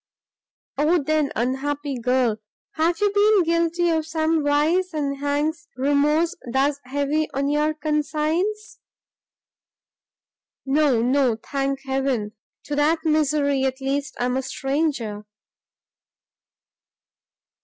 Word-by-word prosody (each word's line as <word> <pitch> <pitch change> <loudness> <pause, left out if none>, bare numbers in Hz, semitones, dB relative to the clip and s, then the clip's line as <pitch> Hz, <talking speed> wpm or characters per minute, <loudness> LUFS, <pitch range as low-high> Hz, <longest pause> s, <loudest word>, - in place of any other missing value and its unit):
"O 315 +4 +3
then, 305 0 +1
unhappy 275 +4 -2
girl! 250 -2 +1 0.3
have 330 +3 0
you 410 -1 +3
been 410 -1 +4
guilty 335 +1 +1
of 320 -1 0
some 315 0 0
vice, 315 +5 +1
and 280 -2 -1
hangs 295 +2 -2
remorse 295 +5 +2 0.2
thus 275 +2 +1
heavy 285 +4 -1
on 280 +1 0
your 300 +1 +1
conscience?" 310 +7 -1 1.9
"No, 270 -4 +2
no; 255 -1 +2
thank 275 +3 -3
heaven, 265 -5 -1 0.3
to 295 - -4
that 315 +3 +1
misery, 295 -3 +2
at 265 0 -1
least, 275 +2 -2
I 245 - +1
am 250 +1 0
a - - 0
stranger!" 270 -6 -2
290 Hz, 110 wpm, -23 LUFS, 270-315 Hz, 1.9 s, been